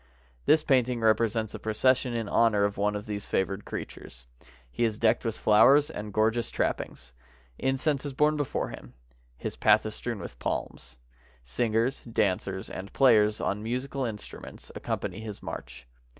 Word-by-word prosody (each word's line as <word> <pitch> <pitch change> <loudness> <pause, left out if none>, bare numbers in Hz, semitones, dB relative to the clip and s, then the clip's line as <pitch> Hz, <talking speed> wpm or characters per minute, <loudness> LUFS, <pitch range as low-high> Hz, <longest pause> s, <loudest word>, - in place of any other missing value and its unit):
This 155 -1 +5
painting 125 -3 +2
represents 110 0 +2
a - - -6
procession 125 +3 +1
in 115 -2 -2
honor 110 -1 +3
of 100 0 0
one 105 +1 0
of 105 +1 -5
these 105 -1 -5
favored 95 +2 -1
creatures. - - -8 0.5
He 120 - -1
is 110 -2 +1
decked 115 0 +2
with 115 -2 -2
flowers 140 +8 +5
and 105 -5 -6
gor 110 +2 +3
geous 120 0 -3
trappings. 65 0 -3 0.5
Incense 135 +2 0
is 145 - -4
borne 150 +3 +3
before 145 -2 -2
him. - - -11 0.4
His - - -5
path - - +4
is - - -4
strewn - - -4
with - - -9
palms. 60 0 -4 0.5
Singers, 115 - 0
dancers, 95 -4 -1
and 95 +2 -7
players 110 -5 +4
on 100 +1 -1
musical 130 +4 -3
instruments 110 -4 -8
accompany 95 +3 -4
his 110 -2 -8
march. 65 - -8
110 Hz, 160 wpm, -28 LUFS, 105-125 Hz, 0.5 s, This